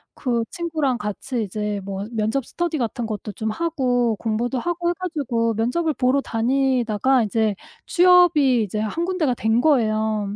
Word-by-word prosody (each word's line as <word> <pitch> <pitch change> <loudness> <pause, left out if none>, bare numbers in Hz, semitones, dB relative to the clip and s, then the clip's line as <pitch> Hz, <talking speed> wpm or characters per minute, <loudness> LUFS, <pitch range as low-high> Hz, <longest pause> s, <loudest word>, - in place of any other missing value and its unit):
그 240 -3 -1
친구랑 320 -8 -1
같이 235 +2 -3
이제 210 0 -3
뭐 195 0 -4
면접 225 +3 -1
스터디 345 -2 -2
같은 240 -2 -2
것도 215 -1 -5
좀 220 +1 -3
하고 250 -6 0
공부도 235 +4 -1
하고 345 +4 -1
해 - - +1
가지고 255 -10 -1
면접을 250 +9 0
보러 260 +1 +2
다니다가 255 0 +1
이제 215 -1 0 0.3
취업이 345 - +5
이제 210 +1 -3
1 315 +11 -2
군데가 350 -8 0
된 225 0 +1
거예요. 215 -7 +1
245 Hz, 305 characters per minute, -22 LUFS, 220-300 Hz, 0.3 s, 취업이